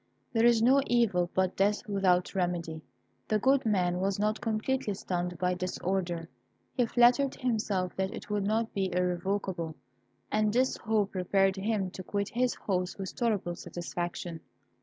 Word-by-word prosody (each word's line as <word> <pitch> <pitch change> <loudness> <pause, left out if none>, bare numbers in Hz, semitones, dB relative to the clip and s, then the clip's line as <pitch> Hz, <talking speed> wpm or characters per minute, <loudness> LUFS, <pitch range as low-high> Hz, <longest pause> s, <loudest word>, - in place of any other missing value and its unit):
There 230 0 +5
is 230 -2 +4
no 265 +3 +6
evil 205 -8 +2
but 185 0 +1
death 205 +3 +1
without 190 -3 +2
remedy. 175 -4 -2 0.5
The 215 - +2
good 265 +3 +3
man 180 -4 +1
was 195 +1 0
not 210 +1 0
completely 225 0 -1
stunned 180 -2 -3
by 180 +1 +1
this 185 0 -3
order. 175 -3 -2 0.5
He 245 -3 +1
flattered 245 +4 +4
himself 210 -7 -1
that 190 +1 0
it - - -8
would 210 -1 -1
not 220 +3 0
be 190 -2 -1
irrevocable, 180 -2 -1 0.6
and 215 0 +2
this 255 +4 +2
hope 215 -3 0
prepared 195 +1 +2
him 195 -1 -1
to 185 - -7
quit 200 +2 -2
his 250 +1 0
host 185 -2 -2
with 190 -2 -5
tolerable 210 -7 -1
satisfaction. 175 -1 -5
195 Hz, 160 wpm, -30 LUFS, 180-220 Hz, 0.6 s, no